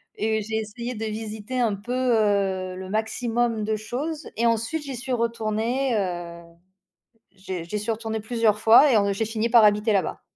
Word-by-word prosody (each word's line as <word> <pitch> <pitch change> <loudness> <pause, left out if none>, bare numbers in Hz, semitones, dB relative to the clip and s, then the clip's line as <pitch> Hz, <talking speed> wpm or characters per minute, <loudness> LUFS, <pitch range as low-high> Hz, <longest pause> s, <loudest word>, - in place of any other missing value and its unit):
et 220 0 0
j'ai 220 +1 -4
essayé 235 +3 -5
de 220 +1 -4
visiter 215 +3 -5
un 225 -4 +1
peu, 205 +5 -8
heu, 200 -7 +1
le 185 0 -7
maximum 225 +1 -1
de 220 - 0
choses, 280 +9 -5
et 235 - +1
ensuite, 230 +7 0
j'y 275 -2 -6
suis 255 +2 -6
retournée, 235 +2 0
heu, 175 -3 -4 0.9
j'ai 190 -3 -6
j'y 210 +4 -3
suis 210 +2 -2
retournée 220 0 -3
plusieurs 220 -1 +1
fois 230 +6 +7
et 225 - +5
en 200 -1 +2
j'ai 210 +3 -1
fini 225 +1 -1
par 235 -1 +7
habiter 210 +1 +4
là-bas. 195 - -1
220 Hz, 180 wpm, -24 LUFS, 210-235 Hz, 0.9 s, fois